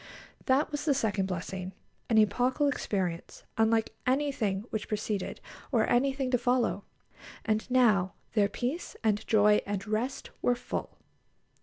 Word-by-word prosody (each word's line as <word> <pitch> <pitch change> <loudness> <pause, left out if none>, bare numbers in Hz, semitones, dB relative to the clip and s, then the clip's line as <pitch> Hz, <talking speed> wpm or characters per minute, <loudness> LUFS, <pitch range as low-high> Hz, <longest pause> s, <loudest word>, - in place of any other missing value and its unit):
That 275 +3 +3
was 295 0 -3
the 290 -3 +3
second 210 -6 0
blessing, 185 +1 -5 0.4
an 225 - +3
epochal 250 +7 +3
experience, 185 -11 -2
unlike 225 0 +2
anything 255 -8 +1
which 215 -1 -3
preceded, 210 -2 -3 0.3
or 230 -5 +3
anything 265 +1 +1
to 250 - +3
follow. 245 -4 +1 0.6
And 220 +2 0
now 215 -8 +3 0.2
their 205 -2 +3
peace 255 +10 -3
and 210 -2 +1
joy 210 -1 +5
and 200 -1 -3
rest 220 +5 -2
were 245 - +3
full. - - -5
220 Hz, 135 wpm, -29 LUFS, 205-255 Hz, 0.6 s, joy